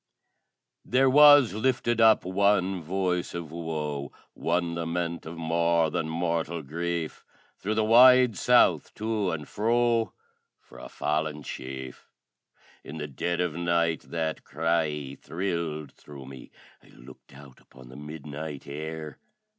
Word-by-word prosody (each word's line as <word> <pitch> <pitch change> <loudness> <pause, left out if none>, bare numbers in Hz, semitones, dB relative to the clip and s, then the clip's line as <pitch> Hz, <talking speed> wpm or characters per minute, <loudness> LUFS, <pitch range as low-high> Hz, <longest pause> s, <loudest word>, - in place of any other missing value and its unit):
There 130 +1 +3
was 145 -4 +7
lifted 120 +1 0
up 110 -4 +5
one 95 -1 +1
voice 90 +1 -2
of 85 -3 -6
woe, 75 -4 -4 0.2
One 85 -1 -1
lament 85 0 -3
of 85 +1 -8
more 85 0 +1
than 80 - -2
mortal 85 0 -2
grief, 85 +2 -4 0.4
Through 105 +3 -2
the 110 - +2
wide 125 +1 +7
South - - +3
to 110 -3 -1
and 80 -4 -4
fro, 115 +1 +1 0.5
For - - -16
a - - -10
fallen 75 0 -2
Chief. 65 -1 -8 0.7
In 75 - -9
the 75 - -4
dead 85 +5 -3
of 90 -3 -1
night 85 -1 0
that 80 -1 -3
cry 75 -3 -2
thrilled 85 -5 -3
through 70 -2 -13
me, 65 -1 -11 0.3
I - - -22
looked 65 +2 -16
out 70 -2 -15
upon 65 -1 -16
the 65 - -12
midnight 75 0 -8
air? 75 0 -7
85 Hz, 130 wpm, -27 LUFS, 75-95 Hz, 0.7 s, was